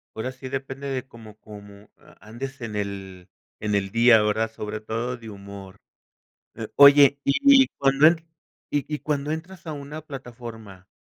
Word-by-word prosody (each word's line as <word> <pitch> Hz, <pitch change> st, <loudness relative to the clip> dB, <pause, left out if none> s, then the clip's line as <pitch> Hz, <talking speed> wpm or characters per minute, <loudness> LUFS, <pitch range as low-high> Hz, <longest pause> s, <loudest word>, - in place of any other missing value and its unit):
Ahora 125 Hz, +4 st, -4 dB
sí, 130 Hz, 0 st, -9 dB
depende 135 Hz, +1 st, -5 dB
de 130 Hz, -1 st, -4 dB
cómo 110 Hz, -4 st, -14 dB
cómo 100 Hz, -1 st, -13 dB
a -, -, -21 dB
andes 130 Hz, +4 st, -7 dB
en 115 Hz, -3 st, -6 dB
el 95 Hz, -2 st, -6 dB, 0.3 s
en 105 Hz, -1 st, -1 dB
el 95 Hz, -1 st, -1 dB
día, 115 Hz, 0 st, +6 dB
¿verdad?, 110 Hz, +1 st, 0 dB
sobre 105 Hz, -1 st, -6 dB
todo 115 Hz, +3 st, -3 dB
de 115 Hz, -2 st, -11 dB
humor. 100 Hz, -1 st, -11 dB, 0.8 s
Eh, 110 Hz, -, -6 dB
oye, 140 Hz, 0 st, +8 dB
y 270 Hz, -, +6 dB
y -, -, -7 dB
cuando 135 Hz, +2 st, +4 dB
en 165 Hz, 0 st, +3 dB, 0.5 s
y 145 Hz, -1 st, 0 dB
y 150 Hz, -, -4 dB
cuando 150 Hz, 0 st, -2 dB
entras 175 Hz, +3 st, -8 dB
a 160 Hz, -, -4 dB
una 150 Hz, +2 st, -8 dB
plataforma, 115 Hz, -8 st, -10 dB
120 Hz, 170 wpm, -24 LUFS, 105-140 Hz, 0.8 s, oye